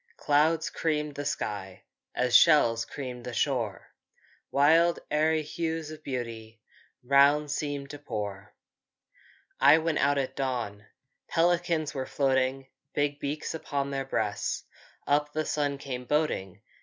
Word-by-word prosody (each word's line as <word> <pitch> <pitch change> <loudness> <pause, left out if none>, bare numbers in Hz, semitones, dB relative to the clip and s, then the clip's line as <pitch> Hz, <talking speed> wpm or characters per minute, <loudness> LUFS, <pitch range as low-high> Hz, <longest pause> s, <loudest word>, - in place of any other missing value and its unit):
Clouds 155 +2 +2
creamed 150 -2 -1
the 145 +1 -5
sky, 100 -8 -4 0.3
As 125 -1 +1
shells 120 -8 +6
creamed 125 -3 -7
the 120 -1 -6
shore; 120 -8 -1 0.6
Wild 165 +5 +4
aery 155 +1 +2
hues 160 0 -3
of 155 0 -10
beauty 115 -4 -5 0.4
Round 140 +3 +4
seemed 145 -2 -3
to 145 - -8
pour! 100 -7 -6 1.0
I 155 - +7
went 165 -1 0
out 145 0 +3
at 130 -1 -2
dawn, 120 -6 -3 0.4
Pelicans 170 -2 +1
were 130 -2 -4
floating, 135 -1 +1 0.3
Big 145 0 0
beaks 145 +2 -3
on 140 -3 -3
their 135 0 -2
breasts; 105 -6 -2 0.4
Up 150 +1 +1
the 155 0 -1
sun 145 -1 -1
came 130 -3 -6
boating. 150 - -1
140 Hz, 130 wpm, -28 LUFS, 125-150 Hz, 1.0 s, I